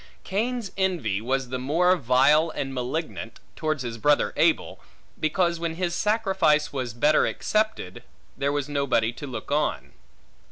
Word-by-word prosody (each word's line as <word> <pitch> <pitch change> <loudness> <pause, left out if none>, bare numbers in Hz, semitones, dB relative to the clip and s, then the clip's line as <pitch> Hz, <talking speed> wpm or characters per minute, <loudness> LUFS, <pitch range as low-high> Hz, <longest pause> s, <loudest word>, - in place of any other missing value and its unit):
Cain's 225 +2 -2
envy 170 - 0
was 130 +2 -1
the 130 0 -3
more 170 +8 +3
vile 150 +3 +4
and 140 -3 -4
malignant, 125 -2 -4 0.2
towards 155 -3 -2
his 115 -2 -5
brother 145 +4 +2
Abel, - - +1 0.4
because 170 +2 +1
when 165 -1 -3
his 175 0 -2
sacrifice 190 -8 +1
was 125 -4 -4
better 150 +5 +3
accepted, 215 - -1 0.3
there 140 0 0
was 145 -1 -2
no 140 -1 -1
body 115 -2 +1
to 145 - -8
look 120 0 -7
on. 150 +1 -1
150 Hz, 150 wpm, -25 LUFS, 130-175 Hz, 0.4 s, vile